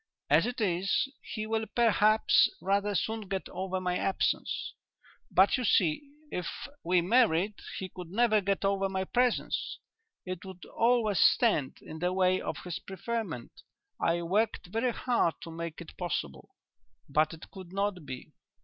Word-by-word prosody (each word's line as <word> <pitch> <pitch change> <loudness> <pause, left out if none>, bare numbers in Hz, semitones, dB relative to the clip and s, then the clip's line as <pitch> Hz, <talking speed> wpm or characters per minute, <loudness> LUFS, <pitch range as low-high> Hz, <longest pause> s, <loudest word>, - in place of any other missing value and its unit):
As - - +5
it 245 0 -4
is, 195 +5 +1
he 215 -1 -5
will 220 0 -1
perhaps 220 -2 +5
rather 200 +1 +1
soon 220 +1 -1
get 190 0 -3
over 185 +1 -3
my 180 -1 -1
absence. 195 - -1 0.6
But, 190 +6 +4
you 255 - -2
see, 170 -8 +3 0.3
if 180 -2 -3 0.4
we 180 +1 +3
married 205 -1 +3 0.2
he 190 - -4
could 180 -2 -9
never 215 +2 +3
get 195 0 0
over 195 0 +1
my 190 0 -1
presence; 245 +5 0 0.5
it 185 -1 -5
would 190 -2 -10
always 230 -5 +2
stand 180 - +3
in 160 - -8
the 180 +2 0
way 185 0 +2
of - - -4
his 180 -2 -4
preferment. 195 - -5 0.4
I 170 +1 +1
worked 205 +6 0
very 230 +3 +1
hard 235 -9 +1
to 165 - -7
make 165 0 -6
it 170 - -11
possible, 70 - -4 0.6
but 155 +3 +2
it 160 - -14
could 185 -3 -10
not 195 -2 -1
be." 130 -3 -8
190 Hz, 155 wpm, -30 LUFS, 175-215 Hz, 0.6 s, As